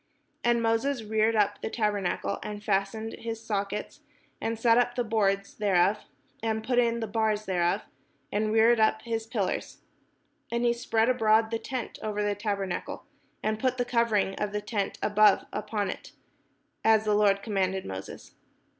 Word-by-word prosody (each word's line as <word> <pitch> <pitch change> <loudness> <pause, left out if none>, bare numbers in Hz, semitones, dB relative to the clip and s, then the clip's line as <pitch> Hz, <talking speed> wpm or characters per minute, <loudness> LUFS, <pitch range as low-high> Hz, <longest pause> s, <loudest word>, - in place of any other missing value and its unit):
And 240 -1 +2
Moses 230 +3 +1
reared 220 +1 +1
up 205 -1 +1
the - - -3
tabernacle, 205 -3 -1
and 210 0 -6
fastened 210 +2 -1
his 230 -1 -4
sockets, 205 -1 -3 0.4
and 225 0 -2
set 230 +1 +4
up 245 0 +1
the 245 - 0
boards 200 -3 0
thereof, 200 -1 +2 0.4
and 220 -1 -1
put 245 +1 +2
in 235 -1 +1
the 225 - -2
bars 215 0 0
thereof, 180 +1 +1 0.5
and 215 +1 0
reared 225 +1 +5
up 220 0 +2
his 225 -1 -3
pillars. 210 -4 -3 0.7
And 235 +1 0
he 235 - +4
spread 230 -1 +1
abroad 220 -3 +3
the 230 - -1
tent 255 -1 -5
over 210 -1 -2
the 205 0 +1
tabernacle, 200 -3 -3 0.4
and 215 0 0
put 255 +1 0
the 245 - 0
cover 235 -2 +1
ing 195 -1 +1
of 210 -1 -1
the 210 - -1
tent 205 -1 -2
above 210 -1 +4
upon 210 -1 -2
it; - - -10 0.7
as 220 -1 +4
the 210 - +2
Lord 200 -1 +3
commanded 190 -3 -1
Moses. 95 0 -8
215 Hz, 165 wpm, -28 LUFS, 205-230 Hz, 0.7 s, reared